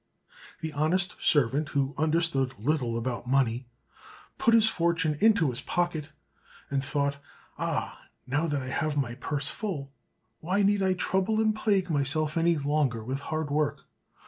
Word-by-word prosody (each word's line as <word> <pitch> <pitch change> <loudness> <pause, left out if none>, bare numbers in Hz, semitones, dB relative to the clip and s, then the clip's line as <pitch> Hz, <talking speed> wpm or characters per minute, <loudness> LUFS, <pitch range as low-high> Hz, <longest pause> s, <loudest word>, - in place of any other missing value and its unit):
The 160 -2 -4
honest 175 +5 +1
servant, 145 +1 +3
who 140 0 0
understood 155 -4 +1
little 125 -2 0
about 120 +1 -3
money, 125 -2 +1 0.7
put 230 - +4
his 220 -1 +5
fortune 165 -5 +1
into 210 - +4
his 125 +3 -6
pocket, 175 -3 -1 0.6
and 135 -1 0
thought, 140 0 -1 0.4
"Ah! - - -3 0.2
now 145 +6 0
that 145 -4 -1
I 130 - -5
have 150 +2 -1
my 125 -4 0
purse 140 +2 -2
full, 155 -11 -4 0.5
why 190 +5 0
need 200 0 +3
I 190 -1 +2
trouble 190 +4 0
and 220 -1 +2
plague 200 -4 +1
myself 150 +2 +1
any 165 0 +3
longer 140 -5 0
with 130 +4 -3
hard 155 0 -3
work!" 145 -1 0
150 Hz, 150 wpm, -28 LUFS, 135-175 Hz, 0.7 s, his